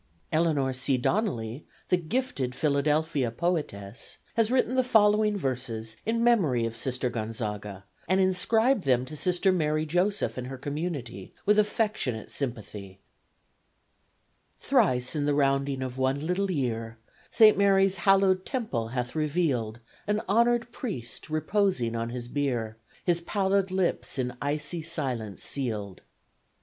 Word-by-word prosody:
Eleanor 155 Hz, -5 st, +1 dB
C. 130 Hz, +1 st, +2 dB
Donnelly, 125 Hz, -, -1 dB, 0.3 s
the -, -, +5 dB
gifted 175 Hz, -, -2 dB
Philadelphia 150 Hz, -2 st, +1 dB
poetess, 115 Hz, -, -3 dB, 0.2 s
has 225 Hz, -1 st, +2 dB
written 255 Hz, 0 st, +2 dB
the 260 Hz, 0 st, +3 dB
following 210 Hz, -3 st, +4 dB
verses 120 Hz, -, -2 dB
in 230 Hz, +1 st, +1 dB
memory 165 Hz, -, +3 dB
of 115 Hz, 0 st, -4 dB
Sister 125 Hz, +2 st, 0 dB
Gonzaga 105 Hz, -4 st, -4 dB, 0.2 s
and 190 Hz, +1 st, +2 dB
inscribed 215 Hz, +5 st, +2 dB
them 125 Hz, -2 st, +2 dB
to 155 Hz, -, -7 dB
Sister 180 Hz, +4 st, +2 dB
Mary 155 Hz, -3 st, +1 dB
Joseph 180 Hz, -1 st, 0 dB
and 125 Hz, -, -5 dB
her 135 Hz, 0 st, -6 dB
community, 140 Hz, -, -5 dB
with 210 Hz, +1 st, +4 dB
affectionate 210 Hz, -, -1 dB
sympathy: 105 Hz, -7 st, -5 dB, 1.6 s
Thrice 125 Hz, +3 st, +2 dB
in 145 Hz, -1 st, 0 dB
the 145 Hz, -, +2 dB
rounding 135 Hz, -1 st, +1 dB
of 130 Hz, 0 st, -5 dB
one 135 Hz, +3 st, 0 dB
little 190 Hz, +3 st, 0 dB
year, 115 Hz, -8 st, -2 dB, 0.3 s
Saint 215 Hz, -2 st, +6 dB
Mary's 195 Hz, -1 st, +3 dB
hallowed 190 Hz, 0 st, +3 dB
temple 215 Hz, -, -2 dB
hath 125 Hz, +1 st, -3 dB
revealed 145 Hz, -8 st, -1 dB, 0.3 s
An 210 Hz, +1 st, +1 dB
honored 235 Hz, +3 st, +2 dB
priest 165 Hz, -, -6 dB
reposing 155 Hz, -, 0 dB
on 115 Hz, 0 st, -2 dB
his 120 Hz, 0 st, -6 dB
bier, 120 Hz, -5 st, -2 dB, 0.3 s
His 175 Hz, -1 st, +2 dB
pallid 195 Hz, +1 st, +1 dB
lips 185 Hz, -5 st, -1 dB
in 125 Hz, -1 st, -2 dB
icy 150 Hz, +4 st, -1 dB
silence 130 Hz, -, -4 dB
sealed. 105 Hz, -8 st, -4 dB
145 Hz, 130 wpm, -27 LUFS, 125-190 Hz, 1.6 s, Saint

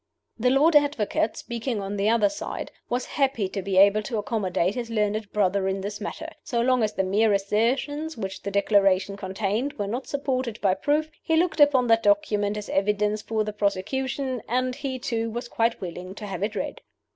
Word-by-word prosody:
The 250 Hz, +3 st, +3 dB
Lord 295 Hz, +5 st, +4 dB
Advocate 285 Hz, -7 st, +2 dB
(speaking 235 Hz, -1 st, -3 dB
on 200 Hz, +1 st, -4 dB
the 205 Hz, +1 st, +1 dB
other 225 Hz, -2 st, +4 dB
side) 300 Hz, -, -5 dB, 0.2 s
was 245 Hz, +1 st, -1 dB
happy 265 Hz, -8 st, 0 dB
to 195 Hz, -, -4 dB
be 190 Hz, 0 st, -2 dB
able 200 Hz, +2 st, +6 dB
to 225 Hz, +1 st, -4 dB
accommodate 195 Hz, -4 st, 0 dB
his 235 Hz, -1 st, -4 dB
learned 210 Hz, -1 st, -1 dB
brother 195 Hz, -1 st, +1 dB
in 195 Hz, 0 st, -1 dB
this 205 Hz, +1 st, -5 dB
matter. -, -, -5 dB
So 240 Hz, -6 st, -2 dB
long 250 Hz, +1 st, +3 dB
as 215 Hz, -1 st, 0 dB
the 190 Hz, -, 0 dB
mere 205 Hz, +3 st, +3 dB
assertions 255 Hz, +10 st, 0 dB
which 190 Hz, -3 st, -5 dB
the 200 Hz, -, -4 dB
Declaration 200 Hz, -1 st, +2 dB
contained 205 Hz, +7 st, -2 dB
were 205 Hz, -8 st, -3 dB
not 240 Hz, +6 st, -4 dB
supported 260 Hz, -5 st, -2 dB
by 195 Hz, -2 st, +3 dB
proof, 300 Hz, +10 st, 0 dB
he 320 Hz, -, +1 dB
looked 335 Hz, -1 st, +1 dB
upon 285 Hz, -4 st, +5 dB
that 225 Hz, -1 st, +4 dB
document 205 Hz, 0 st, +2 dB
as 210 Hz, -, -6 dB
evidence 210 Hz, +1 st, +1 dB
for 220 Hz, 0 st, -1 dB
the 210 Hz, 0 st, -4 dB
prosecution, 250 Hz, +6 st, -1 dB
and 255 Hz, +1 st, +1 dB
he 260 Hz, 0 st, -4 dB
too 230 Hz, -3 st, -2 dB
was 240 Hz, +2 st, -5 dB
quite 230 Hz, 0 st, 0 dB
willing 180 Hz, +1 st, -7 dB
to 210 Hz, -, -7 dB
have 190 Hz, -3 st, -5 dB
it 210 Hz, +2 st, -1 dB
read. -, -, -4 dB
215 Hz, 195 wpm, -25 LUFS, 200-255 Hz, 0.2 s, able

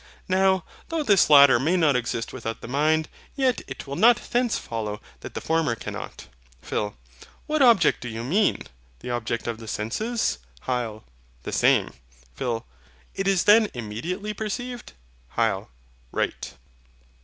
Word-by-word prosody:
Now, 190 Hz, -1 st, +3 dB, 0.3 s
though 330 Hz, -2 st, -1 dB
this 200 Hz, -, +4 dB
latter 140 Hz, -4 st, +8 dB
may 160 Hz, +8 st, +2 dB
not 155 Hz, -6 st, +3 dB
exist 115 Hz, -1 st, -2 dB
without 115 Hz, -3 st, -5 dB
the -, -, -8 dB
mind, 155 Hz, +4 st, +2 dB, 0.3 s
yet 260 Hz, -4 st, +1 dB
it -, -, -7 dB
will 140 Hz, 0 st, -5 dB
not 230 Hz, +8 st, +6 dB
thence 245 Hz, -1 st, +2 dB
follow 105 Hz, -2 st, -4 dB, 0.2 s
that -, -, -10 dB
the -, -, -3 dB
former 160 Hz, -7 st, +1 dB
cannot. -, -, -7 dB, 0.3 s
PHIL. 105 Hz, -, -3 dB, 0.5 s
What 305 Hz, -1 st, 0 dB
object 235 Hz, -6 st, +5 dB
do 125 Hz, -, -5 dB
you 115 Hz, +1 st, -5 dB
mean? 195 Hz, -, +1 dB, 0.4 s
the 125 Hz, -, -5 dB
object 120 Hz, -1 st, -2 dB
of 115 Hz, -1 st, -3 dB
the 115 Hz, -, -10 dB
senses? 165 Hz, -, -1 dB, 0.2 s
HYL. 120 Hz, -4 st, -3 dB, 0.4 s
The -, -, -5 dB
same. -, -, +3 dB, 0.4 s
PHIL. 115 Hz, -, -3 dB, 0.5 s
It 195 Hz, -, -2 dB
is 195 Hz, -3 st, +3 dB
then 210 Hz, +2 st, +6 dB
immediately 165 Hz, -, -4 dB
perceived? 240 Hz, +4 st, -5 dB, 0.4 s
HYL. -, -, +1 dB, 0.4 s
Right. -, -, -2 dB
155 Hz, 145 wpm, -25 LUFS, -, 0.5 s, latter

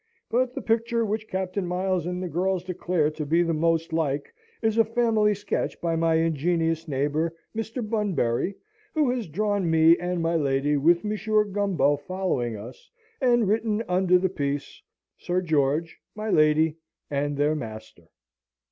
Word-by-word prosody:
But 250 Hz, +1 st, +1 dB
the -, -, -5 dB
picture 230 Hz, 0 st, +1 dB
which 215 Hz, +1 st, -3 dB
Captain 190 Hz, 0 st, -3 dB
Miles 180 Hz, -1 st, -1 dB
and 180 Hz, +1 st, -3 dB
the -, -, -2 dB
girls 180 Hz, +2 st, -1 dB
declare 180 Hz, -4 st, 0 dB
to 155 Hz, 0 st, -5 dB
be 165 Hz, +4 st, +2 dB
most 165 Hz, 0 st, 0 dB
like 145 Hz, -3 st, -1 dB, 0.3 s
is 220 Hz, 0 st, +2 dB
a -, -, +7 dB
family 220 Hz, -2 st, +2 dB
sketch 205 Hz, 0 st, -3 dB
by 170 Hz, -1 st, -1 dB
my 165 Hz, 0 st, +2 dB
ingenious 165 Hz, +1 st, 0 dB
neighbour, 150 Hz, +4 st, -1 dB, 0.2 s
Mr. 225 Hz, +1 st, -4 dB
Bunbury, 195 Hz, -, 0 dB, 0.4 s
who 295 Hz, -5 st, +3 dB
has 245 Hz, -5 st, -3 dB
drawn 200 Hz, +2 st, 0 dB
me 160 Hz, +1 st, +6 dB
and 180 Hz, 0 st, -2 dB
my 165 Hz, 0 st, 0 dB
lady 145 Hz, -1 st, +1 dB
with 170 Hz, +4 st, +3 dB
Monsieur 215 Hz, 0 st, +1 dB
Gumbo 190 Hz, -9 st, +1 dB
following 145 Hz, -8 st, -2 dB
us, 115 Hz, +5 st, -11 dB, 0.3 s
and 240 Hz, -4 st, +3 dB
written 220 Hz, +1 st, 0 dB
under 180 Hz, 0 st, +3 dB
the 185 Hz, +1 st, +1 dB
piece, 145 Hz, -5 st, -4 dB, 0.4 s
"SIR 180 Hz, +1 st, -1 dB
GEORGE, 155 Hz, 0 st, 0 dB, 0.2 s
MY 215 Hz, 0 st, -3 dB
LADY, 155 Hz, +1 st, +3 dB, 0.3 s
AND 145 Hz, 0 st, -1 dB
THEIR 145 Hz, +2 st, +2 dB
MASTER." 110 Hz, -, -8 dB
175 Hz, 155 wpm, -25 LUFS, 155-210 Hz, 0.4 s, a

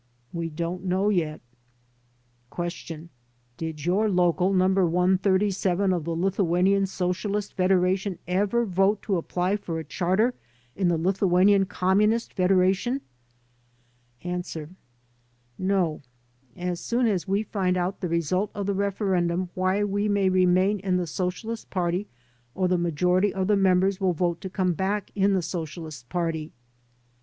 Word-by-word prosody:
"We 170 Hz, -1 st, -3 dB
don't 170 Hz, +3 st, -4 dB
know 190 Hz, +2 st, +1 dB
yet" 160 Hz, -6 st, -1 dB, 1.1 s
Q. 170 Hz, -1 st, -6 dB, 0.5 s
"Did 160 Hz, -2 st, -5 dB
your 200 Hz, +5 st, +2 dB
local 180 Hz, 0 st, +2 dB
No. 185 Hz, -1 st, +3 dB
137 190 Hz, +1 st, +2 dB
of 170 Hz, -4 st, -2 dB
the 165 Hz, 0 st, -2 dB
Lithuanian 190 Hz, +2 st, +2 dB
Socialist 190 Hz, +3 st, -2 dB
Fed 185 Hz, -1 st, +1 dB
eration 185 Hz, 0 st, +1 dB
ever 205 Hz, +6 st, +1 dB
vote 195 Hz, +1 st, +1 dB
to 195 Hz, -3 st, 0 dB
apply 180 Hz, +4 st, -1 dB
for 170 Hz, -5 st, -5 dB
a 160 Hz, -, -4 dB
charter 190 Hz, -, +1 dB, 0.4 s
in 190 Hz, -2 st, +1 dB
the 170 Hz, -1 st, +2 dB
Lithuanian 190 Hz, +2 st, +3 dB
Communist 210 Hz, +6 st, +1 dB
Federation?" 190 Hz, +7 st, +2 dB, 1.2 s
A. 180 Hz, 0 st, -2 dB, 1.2 s
"No.... 185 Hz, -4 st, 0 dB, 0.6 s
As 175 Hz, -1 st, -3 dB
soon 240 Hz, +5 st, 0 dB
as 200 Hz, -4 st, 0 dB
we 200 Hz, +3 st, +1 dB
find 185 Hz, -4 st, -1 dB
out 180 Hz, +2 st, -2 dB
the 180 Hz, -, -3 dB
result 170 Hz, +4 st, 0 dB
of 200 Hz, -, -3 dB
the 200 Hz, -, 0 dB
referendum 185 Hz, -3 st, 0 dB
why 185 Hz, +2 st, +1 dB
we 205 Hz, +1 st, 0 dB
may 200 Hz, -2 st, +2 dB
remain 185 Hz, +2 st, +3 dB
in 185 Hz, -1 st, 0 dB
the 180 Hz, -, -1 dB
Socialist 185 Hz, +7 st, -4 dB
Party 180 Hz, +1 st, -1 dB, 0.5 s
or 185 Hz, -, +1 dB
the 180 Hz, -, +2 dB
majority 180 Hz, +3 st, +1 dB
of 190 Hz, 0 st, -1 dB
the 210 Hz, +2 st, +3 dB
members 190 Hz, 0 st, +2 dB
will 185 Hz, -2 st, +2 dB
vote 170 Hz, 0 st, -1 dB
to 190 Hz, -, -5 dB
come 185 Hz, -1 st, 0 dB
back 195 Hz, +4 st, -2 dB
in 200 Hz, 0 st, +2 dB
the 185 Hz, -2 st, +1 dB
Socialist 160 Hz, -6 st, -6 dB
Party." 165 Hz, -3 st, -2 dB
185 Hz, 140 wpm, -25 LUFS, 175-195 Hz, 1.2 s, No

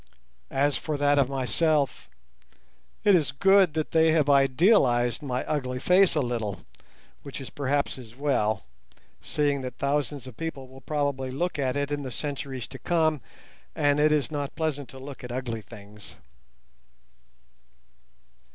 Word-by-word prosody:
As 140 Hz, +1 st, +1 dB
for 155 Hz, -2 st, -3 dB
that 145 Hz, 0 st, +3 dB
of 135 Hz, -2 st, +2 dB
myself, 140 Hz, +2 st, 0 dB, 0.9 s
it 205 Hz, -, +5 dB
is 155 Hz, -6 st, +3 dB
good, 195 Hz, +3 st, +4 dB
but 155 Hz, -1 st, -2 dB
they 160 Hz, 0 st, +4 dB
have 150 Hz, -3 st, +3 dB
idealized 135 Hz, -, +3 dB
my 130 Hz, -3 st, -3 dB
ugly 130 Hz, -4 st, -2 dB
face 180 Hz, +5 st, +4 dB
a 150 Hz, -, +2 dB
little, 115 Hz, -6 st, -3 dB, 0.6 s
which 140 Hz, -, -8 dB
is 135 Hz, -, -8 dB
perhaps 140 Hz, -1 st, -1 dB
as 115 Hz, -2 st, -12 dB
well, 110 Hz, -8 st, 0 dB, 0.6 s
seeing 145 Hz, -2 st, 0 dB
that 125 Hz, -1 st, -6 dB
thousands 140 Hz, -1 st, -1 dB
of 130 Hz, -3 st, -10 dB
people 140 Hz, -4 st, -5 dB
will 130 Hz, +1 st, -14 dB
probably 140 Hz, -3 st, -2 dB
look 160 Hz, +5 st, -2 dB
at 130 Hz, 0 st, 0 dB
it 145 Hz, 0 st, -2 dB
in 145 Hz, 0 st, -1 dB
the 135 Hz, -, -5 dB
centuries 135 Hz, -2 st, -5 dB
to 135 Hz, -, -9 dB
come, 160 Hz, -4 st, +1 dB, 0.5 s
and 145 Hz, -1 st, +2 dB
it 150 Hz, +1 st, +4 dB
is 150 Hz, 0 st, +1 dB
not 145 Hz, -2 st, -4 dB
pleasant 145 Hz, -4 st, -2 dB
to 135 Hz, -, -12 dB
look 135 Hz, 0 st, -9 dB
at 125 Hz, -, -7 dB
ugly 120 Hz, -3 st, -3 dB
things. 105 Hz, -1 st, -13 dB
140 Hz, 150 wpm, -26 LUFS, 130-150 Hz, 0.9 s, it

